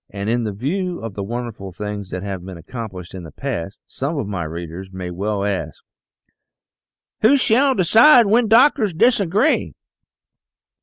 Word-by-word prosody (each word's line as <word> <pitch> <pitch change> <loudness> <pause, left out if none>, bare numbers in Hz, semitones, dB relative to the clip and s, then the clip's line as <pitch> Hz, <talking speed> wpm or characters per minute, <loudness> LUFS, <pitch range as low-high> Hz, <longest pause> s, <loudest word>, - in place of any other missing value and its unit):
And 100 +2 -3
in 115 -3 -1
view 175 - -2
of 115 -2 -6
the 100 - -5
wonderful 115 -3 -6
things 105 +1 -6
that 90 -1 -5
have 95 -3 -5
been 95 -1 -9
accomplished 95 -2 -8
in 95 - -7
the 80 -3 -10
past, 85 +7 -5
some 145 +4 -4
of 140 - -2
my 95 -5 -4
readers 85 +3 -7
may 90 -1 -6
well 100 +2 -2
ask: 100 -2 -4 1.4
"Who 250 +6 +5
shall 265 +2 +3
decide 230 - +6
when 225 +3 +3
doctors 225 - +4
disagree 215 - +2
110 Hz, 150 wpm, -20 LUFS, -, 1.4 s, decide